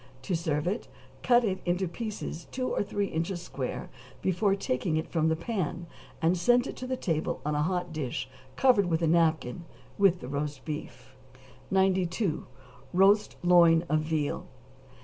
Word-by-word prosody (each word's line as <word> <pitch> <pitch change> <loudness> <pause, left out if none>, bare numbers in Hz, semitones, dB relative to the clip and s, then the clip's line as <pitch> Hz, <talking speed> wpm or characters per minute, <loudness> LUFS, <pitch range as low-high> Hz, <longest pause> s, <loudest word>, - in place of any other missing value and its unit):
To 185 - -1
serve 155 -2 -1
it 200 +6 -2 0.3
cut 240 -1 +4
it 190 -4 0
into 180 +1 0
pieces 200 -3 -5
two 255 0 -2
or - - 0
three 205 0 -1
inches 170 +1 -2
square 135 -6 -5 0.3
before 190 +2 +2
taking 155 -2 -1
it 160 - -2
from 160 -1 +1
the 160 - +2
pan, 175 -2 -3 0.4
and 170 +3 +4
send 245 +8 +3
it - - -5
to 255 - -5
the 260 0 -2
table 160 -8 -1
on 150 - 0
a 150 - +1
hot 175 +1 -1
dish 135 -4 -3 0.3
covered 245 -8 +4
with 165 -1 0
a - - +3
napkin, 160 -3 +2 0.4
with 190 -3 +4
the - - -8
roast 145 0 -4
beef. 150 -3 -7 0.6
92. 190 -1 +1 0.5
=Roast 200 +3 +4
Loin 170 -2 +6
of 155 +1 +3
Veal. 155 -1 -2
175 Hz, 165 wpm, -29 LUFS, 155-195 Hz, 0.6 s, Loin